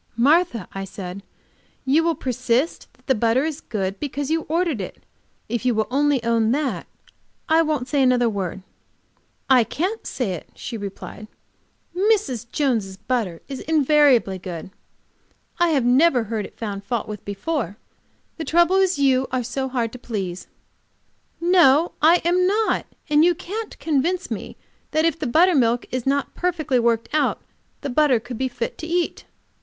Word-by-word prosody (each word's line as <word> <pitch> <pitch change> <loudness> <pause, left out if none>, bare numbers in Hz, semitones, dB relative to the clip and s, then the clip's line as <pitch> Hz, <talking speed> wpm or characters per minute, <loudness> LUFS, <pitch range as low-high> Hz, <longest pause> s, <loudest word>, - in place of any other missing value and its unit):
"Martha," 285 - +3
I 195 - -4
said, 195 0 -7 0.6
"you 290 +5 +3
will 335 -1 +1
persist 255 +3 -1
that - - -29
the 265 - +3
butter 235 +4 +2
is 315 -1 -4
good, 195 -3 -3
because 285 0 -3
you 325 0 0
ordered 330 - 0
it. 185 - -8 0.4
If 235 +2 -2
you 250 -2 +2
will 220 0 +1
only 280 -2 +2
own 230 -1 +2
that, 290 -1 -2 0.6
I 320 +1 +4
won't 300 -6 -1
say 285 -1 +1
another 250 -2 +4
word." 195 -3 -3 0.8
"I 255 -3 +6
can't 370 - -3
say 245 -7 -2
it," 170 - -8
she 240 - -6
returned. 205 +1 -7 0.7
"Mrs. 360 - +1
Jones' 225 -10 0
butter 210 -8 -2
is 270 -2 -6
invariably 285 -10 +3
good. 180 -1 -7 0.9
I 340 -4 +3
never 255 +1 +4
heard 220 -1 -3
it - - -23
found 200 -3 -5
fault 230 +2 -2
with 210 -2 -7
before. 205 - -3 0.6
The 325 - -4
trouble 345 +3 +3
is 380 -3 +2
you 265 -2 +3
are 255 -1 0
so 265 +3 -3
hard 240 -3 -1
to 250 - -10
please." 190 -7 -5 0.9
"No, 335 -3 +5
I 330 +3 +5
am 360 +1 +3
not. 425 +3 +1 0.2
And 300 0 +4
you 350 0 +4
can't 425 +7 -6
convince 330 +4 -1
me - - -5 0.3
that 315 +1 +1
if 330 -1 +1
the 305 - -2
buttermilk 250 -5 +3
is 255 0 -3
not 280 0 0
perfectly 315 -7 0
worked 230 -1 +1
out, 305 - +1 0.4
the 285 - -3
butter 275 -3 +3
could 240 +1 -8
be 260 - +1
fit 245 -2 -5
to 320 - -5
eat." 345 +1 -1
265 Hz, 160 wpm, -22 LUFS, 230-320 Hz, 0.9 s, I